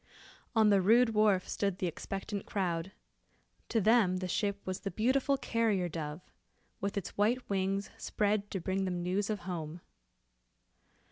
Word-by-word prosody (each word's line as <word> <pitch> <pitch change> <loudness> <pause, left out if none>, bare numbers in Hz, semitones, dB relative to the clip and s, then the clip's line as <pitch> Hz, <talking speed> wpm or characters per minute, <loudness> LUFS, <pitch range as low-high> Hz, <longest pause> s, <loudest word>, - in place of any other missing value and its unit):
On 220 -2 +5
the 200 -1 +5
rude 225 +5 +5
wharf 210 -3 +3
stood 200 -3 -1
the 190 - -2
expectant 195 +4 -4
crowd. 180 -2 -2 0.8
To 230 - +2
them 215 -3 +4
the 185 0 -3
ship 200 +2 -1
was 185 0 -3
the 195 - -4
beautiful 260 +6 +1
carrier 220 -8 +1
dove, 155 0 -5 0.6
with 200 +1 -3
its 195 - -4
white 240 +5 +2
wings 195 +1 -1
spread 205 -1 0
to 190 - -3
bring 190 +2 -1
them 180 -2 -2
news 195 +3 0
of 210 -2 -2
home. 170 -2 -5
195 Hz, 150 wpm, -32 LUFS, 185-215 Hz, 0.8 s, On